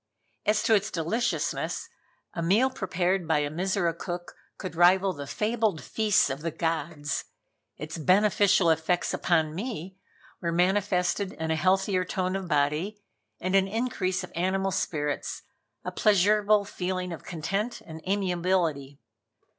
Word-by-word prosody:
As 210 Hz, 0 st, +3 dB
to 230 Hz, -1 st, +3 dB
its 210 Hz, 0 st, +2 dB
deliciousness, 220 Hz, +8 st, -1 dB, 0.5 s
a 170 Hz, -, -3 dB
meal 210 Hz, +10 st, +3 dB
prepared 185 Hz, -3 st, -1 dB
by 160 Hz, -2 st, +3 dB
a 145 Hz, 0 st, -1 dB
Mizora 180 Hz, +1 st, 0 dB
cook 175 Hz, 0 st, -6 dB, 0.2 s
could 185 Hz, -3 st, -6 dB
rival 185 Hz, +3 st, +5 dB
the 140 Hz, -3 st, -7 dB
fabled 215 Hz, -, 0 dB
feasts 215 Hz, -10 st, +2 dB
of 135 Hz, +2 st, -5 dB
the 165 Hz, -, -1 dB
gods. 160 Hz, -2 st, -2 dB, 0.5 s
Its 155 Hz, +2 st, -6 dB
beneficial 195 Hz, +1 st, +4 dB
effects 160 Hz, +3 st, 0 dB
upon 160 Hz, -3 st, +1 dB
me 190 Hz, -2 st, -5 dB, 0.4 s
were 170 Hz, -2 st, -1 dB
manifested 185 Hz, +1 st, +1 dB
in 160 Hz, 0 st, -3 dB
a -, -, +2 dB
healthier 185 Hz, +3 st, +2 dB
tone 185 Hz, +1 st, -2 dB
of 195 Hz, -1 st, -3 dB
body 150 Hz, +7 st, 0 dB, 0.4 s
and 185 Hz, +1 st, -2 dB
an 195 Hz, 0 st, +4 dB
an -, -, -10 dB
increase 190 Hz, -6 st, -1 dB
of 180 Hz, -, -9 dB
animal 190 Hz, +2 st, 0 dB
spirits, 150 Hz, -5 st, -2 dB, 0.4 s
a -, -, -2 dB
pleasurable 210 Hz, 0 st, +3 dB
feeling 185 Hz, -2 st, -3 dB
of 165 Hz, -, -9 dB
content 195 Hz, +8 st, -3 dB
and 160 Hz, -1 st, -10 dB
amiability. 175 Hz, -7 st, 0 dB
185 Hz, 140 wpm, -27 LUFS, 165-200 Hz, 0.5 s, rival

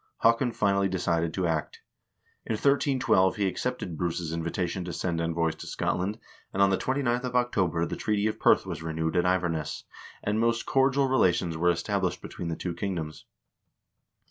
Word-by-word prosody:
Haakon 115 Hz, +2 st, +4 dB
finally 100 Hz, -3 st, +2 dB
decided 85 Hz, -3 st, 0 dB
to 95 Hz, -, 0 dB
act. 80 Hz, -2 st, -2 dB, 0.7 s
In -, -, 0 dB
1312 130 Hz, -6 st, +3 dB
he 105 Hz, -2 st, 0 dB
accepted 95 Hz, -3 st, -3 dB
Bruce's 85 Hz, -2 st, -2 dB
invita 85 Hz, +2 st, -1 dB
tion 90 Hz, +2 st, -4 dB
to 90 Hz, -, -5 dB
send 85 Hz, -1 st, -1 dB
envoys 85 Hz, -1 st, 0 dB
to -, -, -9 dB
Scotland, 95 Hz, +4 st, -1 dB, 0.3 s
and 95 Hz, -, -4 dB
on 100 Hz, 0 st, +5 dB
the 95 Hz, -, +2 dB
29th 130 Hz, -2 st, 0 dB
of 125 Hz, -1 st, -4 dB
October 95 Hz, -9 st, +1 dB
the -, -, -4 dB
treaty 105 Hz, -1 st, 0 dB
of 110 Hz, -, -1 dB
Perth -, -, +4 dB
was -, -, -5 dB
renewed 80 Hz, 0 st, -2 dB
at 90 Hz, 0 st, +3 dB
Iverness, 85 Hz, -4 st, -1 dB, 0.4 s
and 105 Hz, +2 st, 0 dB
most 115 Hz, 0 st, +1 dB
cordial 135 Hz, 0 st, +3 dB
rela 130 Hz, -9 st, +4 dB
tions 85 Hz, -1 st, -2 dB
were 85 Hz, +2 st, +2 dB
established 90 Hz, +1 st, -1 dB
between 85 Hz, -, -6 dB
the 85 Hz, -, -2 dB
two 90 Hz, +1 st, -4 dB
kingdoms. 85 Hz, -4 st, -4 dB
95 Hz, 175 wpm, -28 LUFS, 85-110 Hz, 0.7 s, on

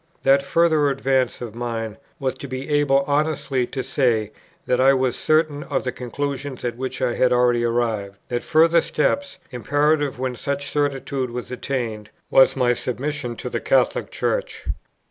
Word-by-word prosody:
That 135 Hz, +1 st, +5 dB
further 155 Hz, 0 st, +3 dB
advance 135 Hz, -2 st, 0 dB
of 115 Hz, -3 st, -6 dB
mind 115 Hz, -2 st, -4 dB, 0.2 s
was 130 Hz, -3 st, -1 dB
to 140 Hz, -, -6 dB
be 130 Hz, +1 st, -5 dB
able 145 Hz, -2 st, +3 dB
honestly 145 Hz, -3 st, 0 dB
to 130 Hz, -, -4 dB
say 120 Hz, -5 st, +1 dB, 0.3 s
that 125 Hz, 0 st, +2 dB
I 135 Hz, +1 st, +6 dB
was 130 Hz, -2 st, +1 dB
certain 155 Hz, -2 st, +1 dB
of -, -, -2 dB
the 125 Hz, -, -2 dB
conclusions 135 Hz, +1 st, -4 dB
at 120 Hz, -1 st, -2 dB
which 130 Hz, +1 st, -4 dB
I 120 Hz, -2 st, +1 dB
had 125 Hz, -1 st, +2 dB
already 120 Hz, -1 st, +3 dB
arrived. 115 Hz, -4 st, -1 dB
That 120 Hz, -1 st, -1 dB
further 165 Hz, +1 st, +4 dB
step, 275 Hz, -, +1 dB, 0.3 s
imperative 145 Hz, +3 st, +1 dB
when 130 Hz, 0 st, -2 dB
such 140 Hz, +2 st, -3 dB
certitude 140 Hz, -2 st, -1 dB
was 120 Hz, +1 st, -6 dB
attained, 120 Hz, -5 st, -3 dB, 0.2 s
was 135 Hz, -, +6 dB
my 125 Hz, -2 st, +3 dB
submission 125 Hz, +1 st, -3 dB
to -, -, -6 dB
the -, -, -2 dB
Catholic -, -, +2 dB
Church. -, -, -2 dB
130 Hz, 165 wpm, -22 LUFS, 120-145 Hz, 0.3 s, I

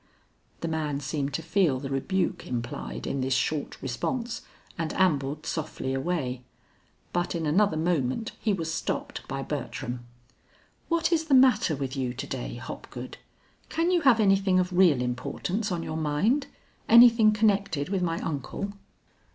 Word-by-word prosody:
The 165 Hz, -, -2 dB
man 155 Hz, -3 st, -1 dB
seemed 140 Hz, 0 st, -2 dB
to 165 Hz, -, -3 dB
feel 165 Hz, -7 st, +2 dB
the 135 Hz, +1 st, -6 dB
rebuke 180 Hz, +8 st, -1 dB
implied 120 Hz, -1 st, -4 dB
in 135 Hz, -, -2 dB
this 130 Hz, 0 st, +1 dB
short 150 Hz, +3 st, -1 dB
response, 230 Hz, -, -2 dB, 0.3 s
and 165 Hz, -2 st, -2 dB
ambled 150 Hz, -5 st, +1 dB
softly 155 Hz, -4 st, -3 dB
away. 135 Hz, -3 st, -2 dB, 0.7 s
But 175 Hz, 0 st, 0 dB
in 165 Hz, -1 st, -2 dB
another 175 Hz, +3 st, +3 dB
moment 160 Hz, -, 0 dB
he 220 Hz, -, +1 dB
was 165 Hz, -4 st, -2 dB
stopped -, -, -3 dB
by -, -, -3 dB
Bertram. 120 Hz, 0 st, -4 dB, 0.9 s
"What 335 Hz, 0 st, +1 dB
is 320 Hz, -1 st, +2 dB
the 285 Hz, -4 st, +4 dB
matter 255 Hz, -, +5 dB
with 135 Hz, -1 st, -4 dB
you 130 Hz, -2 st, -2 dB
to -, -, -4 dB
day, -, -, -5 dB
Hopgood? -, -, -8 dB, 0.5 s
Can 335 Hz, +3 st, +1 dB
you 355 Hz, -2 st, +3 dB
have 265 Hz, -6 st, +5 dB
anything 195 Hz, -2 st, +4 dB
of 180 Hz, 0 st, -1 dB
real 175 Hz, -9 st, +5 dB
importance 180 Hz, -, -2 dB
on 170 Hz, -2 st, -2 dB
your 155 Hz, -, -4 dB
mind; 160 Hz, -, +1 dB, 0.4 s
anything 230 Hz, -2 st, +8 dB
connected 200 Hz, -8 st, +1 dB
with 195 Hz, -2 st, 0 dB
my 165 Hz, -2 st, 0 dB
uncle?" 165 Hz, +7 st, -4 dB
165 Hz, 150 wpm, -27 LUFS, 140-205 Hz, 0.9 s, anything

